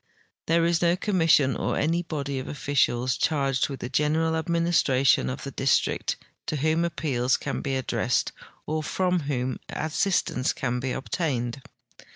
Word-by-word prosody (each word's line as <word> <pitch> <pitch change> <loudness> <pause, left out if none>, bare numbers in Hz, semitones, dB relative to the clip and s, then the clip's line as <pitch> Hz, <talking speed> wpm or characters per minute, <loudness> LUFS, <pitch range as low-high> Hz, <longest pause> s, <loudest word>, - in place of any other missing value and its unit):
There 165 +1 +3
is 170 -1 +2
no 170 0 +3
commission 165 -8 +3
or - - -1
any 165 +3 +1
body 140 -5 -3
of 130 - -6
officials 130 -3 0
cliarged 135 -4 +1
Avitli 135 - -5
the 120 - -4
general 155 +4 +1
administration 165 -5 +2
of 130 - -5
the 140 - -5
dis 135 0 +3
trict - - -2 0.3
to - - -1
whom 155 +3 +1
api>eals 135 -7 0
can - - -3
be 135 -2 -2
addressed 130 -2 0 0.3
or 155 +1 -1
from 180 +3 0
whom 130 -2 -1
assistance 155 -5 0
can 125 -2 -2
be 130 +1 -2
obtained. 130 -3 -2
145 Hz, 155 wpm, -26 LUFS, 130-165 Hz, 0.3 s, There